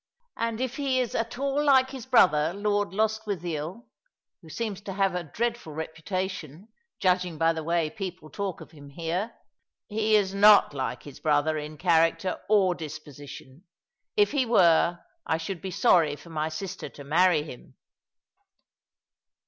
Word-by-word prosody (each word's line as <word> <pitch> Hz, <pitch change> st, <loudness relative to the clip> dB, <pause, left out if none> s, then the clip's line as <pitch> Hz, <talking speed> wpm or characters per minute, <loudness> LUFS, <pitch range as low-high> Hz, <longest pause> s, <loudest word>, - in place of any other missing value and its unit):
And 230 Hz, -1 st, -2 dB
if 255 Hz, 0 st, -3 dB
he 270 Hz, -3 st, +1 dB
is 250 Hz, -2 st, -1 dB
at 230 Hz, +1 st, -2 dB
all 275 Hz, +2 st, 0 dB
like 265 Hz, -2 st, +4 dB
his 260 Hz, -4 st, -8 dB
brother, 160 Hz, -9 st, +4 dB
Lord 205 Hz, -2 st, 0 dB
Lostwithiel, 200 Hz, -, -2 dB, 0.6 s
who 165 Hz, -, -15 dB
seems 205 Hz, +2 st, -4 dB
to 200 Hz, -1 st, -6 dB
have 195 Hz, -1 st, +1 dB
a 180 Hz, -1 st, -2 dB
dreadful 230 Hz, -, -3 dB
reputation, 160 Hz, +2 st, -5 dB, 0.3 s
judging 180 Hz, -3 st, +1 dB
by 165 Hz, +1 st, +3 dB
the 160 Hz, -1 st, -5 dB
way 165 Hz, -1 st, 0 dB
people 185 Hz, -6 st, -7 dB
talk 200 Hz, -4 st, -4 dB
of -, -, -12 dB
him 145 Hz, -3 st, -13 dB
here 170 Hz, +9 st, -3 dB, 0.3 s
" -, -, -60 dB
"He 215 Hz, 0 st, +2 dB
is 195 Hz, -2 st, +2 dB
not 205 Hz, -4 st, +6 dB
like 130 Hz, -2 st, -4 dB
his 145 Hz, -, -11 dB
brother 155 Hz, 0 st, +2 dB
in 150 Hz, 0 st, -6 dB
character 170 Hz, +2 st, +2 dB
or 195 Hz, -4 st, +4 dB
disposition. 150 Hz, -1 st, -10 dB, 0.5 s
If 415 Hz, -1 st, +4 dB
he 285 Hz, -3 st, +2 dB
were, 175 Hz, -7 st, +4 dB, 0.3 s
I 160 Hz, -, +1 dB
should 165 Hz, +2 st, -5 dB
be 190 Hz, -, -5 dB
sorry 175 Hz, -6 st, +3 dB
for 145 Hz, +4 st, -14 dB
my 155 Hz, 0 st, -2 dB
sister 165 Hz, +4 st, -6 dB
to 140 Hz, -, -12 dB
marry 160 Hz, +2 st, +3 dB
him." 135 Hz, -5 st, -12 dB
180 Hz, 155 wpm, -27 LUFS, 155-215 Hz, 0.6 s, not